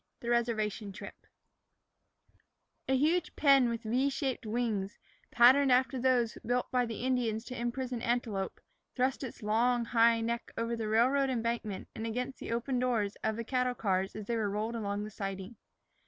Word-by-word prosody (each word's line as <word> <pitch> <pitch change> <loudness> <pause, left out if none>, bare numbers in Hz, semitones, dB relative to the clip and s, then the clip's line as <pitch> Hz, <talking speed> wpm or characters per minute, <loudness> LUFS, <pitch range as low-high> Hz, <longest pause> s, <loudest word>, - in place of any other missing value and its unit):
XVI - - -52
THE 235 - -4
RESERVATION 220 -3 0
TRIP 210 - -11 1.6
A 265 - +4
HUGE 315 +4 +1
pen 275 -4 +5
with 230 0 -3
V 250 +5 +1
shaped 270 -4 -3
wings, 215 -4 -2 0.3
patterned 260 +3 +6
after 255 +1 +3
those 245 -2 +1
built 245 +1 -1
by 250 -1 +2
the 230 +1 -5
Indians 240 -3 0
to 255 - -7
imprison 245 0 -3
antelope, 225 -5 -2 0.4
thrust 260 +2 0
its 245 -3 -7
long, 235 +3 +2
high 230 0 +4
neck 235 +1 -3
over 230 +1 -1
the 225 -2 -3
railroad 260 +5 +3
embankment 230 -5 -2
and 225 - -4
against 250 +4 -3
the - - -6
open 245 +2 -1
doors 230 -5 0
of 220 - 0
the 230 - -4
cattle 250 +1 0
cars 190 -3 -1
as 215 -1 -6
they 235 - -1
were 215 -3 0
rolled 215 +3 -2
along 205 -2 -2
the 215 - -7
siding. 195 +1 -5
235 Hz, 170 wpm, -31 LUFS, 220-250 Hz, 1.6 s, patterned